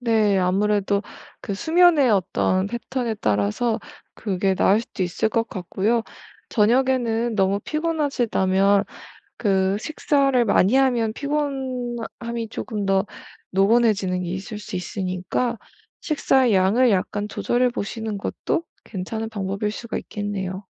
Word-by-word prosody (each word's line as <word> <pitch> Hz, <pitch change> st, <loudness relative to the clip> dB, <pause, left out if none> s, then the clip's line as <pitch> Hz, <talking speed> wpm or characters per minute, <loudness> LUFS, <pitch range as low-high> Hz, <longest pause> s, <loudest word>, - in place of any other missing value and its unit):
네 220 Hz, -4 st, +2 dB
아무래도 200 Hz, +2 st, +1 dB, 0.4 s
그 200 Hz, -, -4 dB
수면의 320 Hz, -, +4 dB
어떤 185 Hz, -1 st, +1 dB
패턴에 235 Hz, +1 st, -3 dB
따라서 105 Hz, -, +1 dB, 0.4 s
그게 195 Hz, -2 st, 0 dB
나을 200 Hz, +3 st, +3 dB
수도 230 Hz, -, -5 dB
있을 180 Hz, +4 st, 0 dB
것 225 Hz, +1 st, 0 dB
같고요. 200 Hz, +5 st, -1 dB, 0.5 s
저녁에는 235 Hz, 0 st, +2 dB
너무 195 Hz, -1 st, +2 dB
피곤하시다면 235 Hz, -, +1 dB, 0.5 s
그 190 Hz, -2 st, +1 dB
식사를 275 Hz, -2 st, +1 dB
많이 205 Hz, +1 st, +3 dB
하면 245 Hz, -5 st, +2 dB
피곤함이 250 Hz, -5 st, -3 dB
조금 215 Hz, -3 st, -4 dB
더 195 Hz, +1 st, +2 dB, 0.4 s
노곤해지는 195 Hz, -2 st, +2 dB
게 175 Hz, -, -4 dB
있을 195 Hz, +4 st, -5 dB
수 205 Hz, -, -6 dB
있으니까 185 Hz, +6 st, -2 dB, 0.4 s
식사의 265 Hz, -6 st, +2 dB
양을 205 Hz, +7 st, +4 dB
약간 205 Hz, +1 st, -1 dB
조절해 245 Hz, +4 st, +1 dB
보시는 220 Hz, -2 st, -4 dB
것도 330 Hz, +10 st, -2 dB, 0.2 s
괜찮은 220 Hz, +3 st, -4 dB
방법일 200 Hz, -1 st, -2 dB
수가 230 Hz, +2 st, -6 dB
있겠네요. 200 Hz, -2 st, -5 dB
215 Hz, 275 characters per minute, -23 LUFS, 195-245 Hz, 0.5 s, 수면의